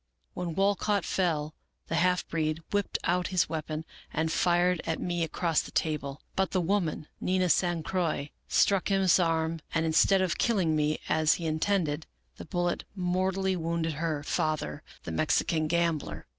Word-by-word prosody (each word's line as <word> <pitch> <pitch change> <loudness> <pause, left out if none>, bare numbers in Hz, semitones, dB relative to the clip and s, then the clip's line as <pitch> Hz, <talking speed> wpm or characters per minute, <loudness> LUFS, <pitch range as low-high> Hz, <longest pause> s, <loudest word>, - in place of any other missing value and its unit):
When 175 -3 -4
Walcott 200 0 +1
fell, 155 -5 0 0.3
the - - -5
half 180 +1 +2
breed 160 0 -1
whipped 205 -1 0
out 180 +1 +1
his 185 -2 +2
weapon, 155 0 -4 0.3
and 160 +1 0
fired 175 0 +2
at 160 -1 -2
me 175 -1 -1
across 165 0 0
the - - -9
table; 145 -3 -2
but 190 0 +1
the 185 - 0
woman, 175 -4 0
Nina 185 0 +1
San 175 -2 +2
Croix, 165 -5 -1 0.2
struck 195 -2 +3
his 195 -2 +4
arm, 165 -1 0
and, 165 0 +2
instead 185 +4 +4
of 180 - -1
killing 185 -9 +2
me, 150 0 +1
as 155 -1 +3
he 170 - -5
intended, 160 -1 0 0.3
the 85 - -8
bullet 175 - -1
mortally 185 +1 0
wounded 165 -1 -1
her 155 -3 -1
father, 155 - -1 0.2
the - - -5
Mexican 155 - +1
gambler. 170 -2 -1
170 Hz, 160 wpm, -29 LUFS, 155-185 Hz, 0.3 s, his